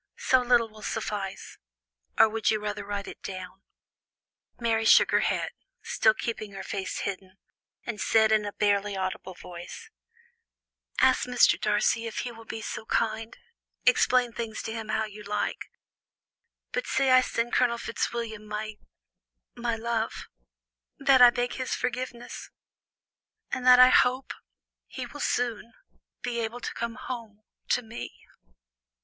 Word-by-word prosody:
so 260 -1 +3
little 240 -2 +3
will 215 -1 -15
suffice; 205 -3 -4 0.6
or - - +7
would 220 0 0
you 215 - +2
rather 210 0 -4
write 200 0 -4
it?" - - -9 1.4
Mary 225 -2 +1
shook - - +6
her - - +4
head, - - 0 0.3
still 220 -1 +3
keeping 215 -3 -4
her 195 - -6
face 195 -2 -4
hidden, 190 -1 -5 0.5
and 230 -3 -4
said 220 -1 +4
in 215 -1 +4
a 205 - -4
barely 205 -1 +1
audible 185 0 -4
voice: 180 - -10 1.1
"Ask 260 -1 +4
Mr. 250 -1 +4
Darcy, 215 +2 +1
if 225 - -3
he 245 - -5
will 225 -1 -13
be 225 -1 -6
so 220 - -6
kind 225 0 -1 0.5
explain 250 -1 +4
things 225 -2 -5
to 220 - -4
him 225 -1 -5
how 220 0 0
you 210 0 -10
like 210 0 -3 1.0
but - - -2
say 265 -1 +2
I 255 0 +7
send 240 -1 -2
Colonel 240 -2 +3
Fitzwilliam 230 -2 -3
my 210 0 -5 0.8
my 235 -1 -2
love; 225 0 -2 0.7
that 265 -2 +5
I 245 - +11
beg 245 0 -1
his 255 -1 -2
forgiveness; 250 -1 -5 1.0
and 255 0 -2
that 250 0 +9
I 255 0 +9
hope 255 +1 +3 0.5
he - - -6
will - - -10
soon 235 -1 -1 0.5
be 245 -1 -2
able 230 +1 -3
to - - -5
come 235 0 -4
home 230 -5 -7 0.3
to 250 - +2
me." 225 +1 -9
225 Hz, 145 wpm, -27 LUFS, 210-245 Hz, 1.4 s, I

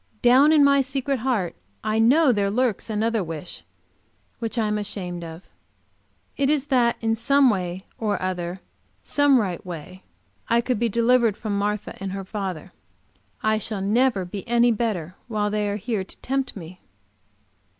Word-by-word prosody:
Down 260 +5 +6
in 305 -2 +6
my 280 0 +5
secret 270 0 -2
heart 220 -8 -1 0.3
I 215 +1 0
know 265 +6 +5
there 200 -3 +1
lurks 235 0 0
another 220 0 0
wish, 165 0 -7 0.8
which 230 +1 -4
I 225 - +2
am 210 0 0
ashamed 180 -4 -5
of. 165 +2 -9 0.9
It 280 -1 +1
is 295 -2 +1
that 240 -2 +3
in 225 -1 +1
some 275 +3 +4
way 185 -1 -3
or 210 -2 0
other, 180 0 -3 0.4
some 285 -2 +3
right 185 -6 -2
way, 180 +1 -8 0.5
I 235 - +3
could 240 -2 -1
be 235 0 +1
delivered 235 -1 +3
from 215 -3 -3
Martha 205 +1 -2
and 195 -1 -4
her 195 -1 -5
father. 190 -5 -5 0.7
I 215 0 +2
shall 215 -1 -3
never 210 0 +2
be 190 +2 -6
any 240 0 +4
better 205 -7 -2
while 210 -3 -1
they 210 -1 0
are 200 - -1
here 210 -1 -2
to - - -6
tempt 270 0 -2
me! 180 -1 -10
215 Hz, 165 wpm, -24 LUFS, 190-245 Hz, 0.9 s, Down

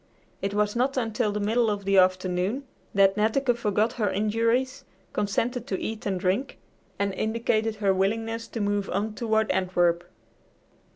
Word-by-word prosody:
It 200 +1 -2
was 210 +1 +1
not 260 +3 +1
until 225 -2 0
the 210 - -2
middle 225 +3 +2
of 205 -2 -3
the 195 -1 +5
afternoon 185 +6 +1 0.3
that 195 -1 +4
Netteke 240 +4 +2
forgot 215 0 +1
her 215 -4 0
injuries, 230 +7 0 0.3
consented 235 +4 -1
to 190 - -2
eat 220 -1 -4
and 190 -2 -1
drink, 190 +9 -1 0.4
and 200 -1 0
indicated 220 +1 0
her 200 -2 +2
willingness 225 +4 -1
to 230 - -5
move 205 -1 0
on 210 +3 -1
toward 220 -1 +1
Antwerp. 175 -2 +1
210 Hz, 155 wpm, -26 LUFS, 195-230 Hz, 0.4 s, the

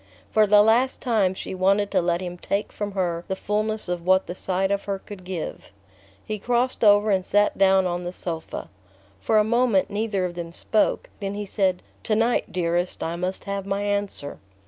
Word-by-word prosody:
For 215 -1 +4
the 205 0 +7
last 240 +4 +3
time 210 -7 +1
she - - -6
wanted 195 +2 +2
to 185 - +3
let 170 0 0
him 180 -1 -5
take 200 +3 -2
from 205 -1 -4
her 175 -3 -1
the 190 - -2
fulness 215 +2 -2
of 175 -1 -3
what 185 +1 +3
the - - -5
sight 190 +1 -1
of 200 0 -1
her 200 -1 -2
could 190 -1 -11
give. 180 -3 -6 0.6
He 215 -1 -4
crossed 245 +3 0
over 205 0 +5
and 190 -1 +2
sat 205 +2 +2
down 190 -1 +4
on 175 0 -2
the 175 - -4
sofa. 165 -3 -5 0.5
For 215 - +2
a 210 - +6
moment 235 -3 +2
neither 205 -2 -1
of 175 - -4
them 170 -1 -6
spoke; 215 +4 0
then 200 -1 -3
he 205 0 -4
said: 190 -2 0 0.2
"To 215 - +2
night, 230 +2 +1
dearest, 175 0 -1
I 165 +1 -2
must 180 +2 -3
have 200 -1 -4
my 200 +1 -1
answer." 200 -8 -2
195 Hz, 200 wpm, -24 LUFS, 180-210 Hz, 0.6 s, the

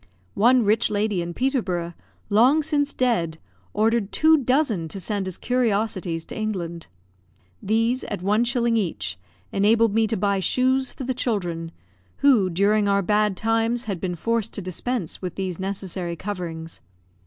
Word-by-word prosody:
One 245 +3 +4
rich 215 +3 +2
lady 205 -3 0
in 170 0 -5
Peterborough, 190 -11 -1 0.4
long 255 +9 +5
since 290 -1 0
dead, 195 -11 0 0.3
ordered 220 -1 +1
two 315 +1 +5
dozen 255 - +1
to 195 - -7
send 200 0 -3
as 185 - -4
curiosities 205 -8 -1
to - - -9
England. 175 -6 -4 0.7
These, 225 +4 +1
at 200 -3 -5
one 210 +4 +3
shilling 235 -1 +1
each, 110 - -2 0.3
enabled 220 +2 +3
me 225 0 +3
to 220 - -1
buy 200 0 +1
shoes 260 +6 +2
for - - -7
the 260 +1 -1
children, 175 -9 -2 0.5
who, 240 -10 +4
during 200 +4 +2
our 200 0 +2
bad 210 0 +1
times, 225 +2 0
had 200 -5 -4
been 180 -2 -2
forced 230 +4 -1
to 205 - -3
dispense 185 +2 -3
with 180 -2 -5
these 185 -3 -4
necessary 190 -2 -4
coverings. 165 - -6
210 Hz, 155 wpm, -24 LUFS, 185-235 Hz, 0.7 s, long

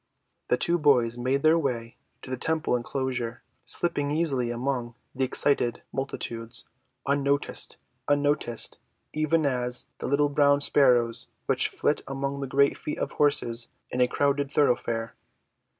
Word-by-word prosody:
The 125 - +2
two 170 +5 +1
boys 125 -6 +4
made 130 +3 0
their 160 +1 +5
way 120 -6 -2 0.3
to 130 - -8
the - - 0
temple 155 +1 0
enclosure, 125 -1 -3 0.2
slipping 145 -4 0
easily 145 -6 0
among 120 -1 -2 0.2
the 130 - -1
excited 130 -2 +1
multitudes, 115 -4 -4 0.4
unnoticed 140 0 0 1.4
even 155 +1 +1
as 125 -2 -1
the - - -3
little 145 +2 +3
brown 145 0 +4
sparrows 125 -5 +3 0.2
which - - +2
flit - - 0
among 140 +1 -3
the 135 - -3
great 140 +1 +3
feet 150 - -4
of - - -2
horses 120 -5 +1 0.2
in 125 - 0
a 125 - +5
crowded 140 +1 +1
thoroughfare. 120 -5 +1
135 Hz, 135 wpm, -27 LUFS, 120-145 Hz, 1.4 s, their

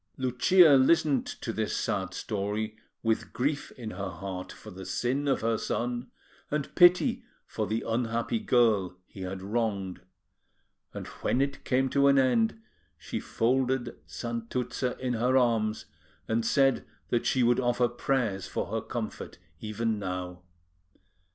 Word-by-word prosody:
Lucia 140 +5 +5
listened 140 0 +3
to 115 - -5
this 110 0 -1
sad 95 -2 -1
story 105 +2 -3 0.3
with 115 -1 0
grief 140 +3 -1
in 115 -3 -7
her 100 -1 -4
heart 95 +1 -6
for 110 - -11
the 95 0 -9
sin 135 +8 -1
of 135 - +1
her 115 0 +1
son, 120 +1 -2 0.4
and 150 -1 -2
pity 190 +8 +5 0.2
for 110 -2 -3
the 110 +3 -1
unhappy 115 - 0
girl 110 - +2
he 95 - -12
had 95 0 -5
wronged; 100 -3 -2 0.9
and - - -6 0.2
when 125 - +1
it 140 0 -1
came 130 +1 +2
to 140 +1 +3
an 140 0 +5
end, 220 - +3 0.4
she - - -5
folded 125 0 0
Santuzza 120 - -3
in 130 -1 -2
her 125 +3 +2
arms, 115 -4 +1 0.4
and 115 +1 +1
said 135 +3 +3 0.3
that 120 - +1
she 130 - +2
would 120 0 +4
offer 120 -1 +2
prayers 120 -5 -1
for - - -3
her - - -1
comfort - - -5 0.2
even 110 +1 -2
now. 90 -2 -4
120 Hz, 145 wpm, -28 LUFS, 110-130 Hz, 0.9 s, Lucia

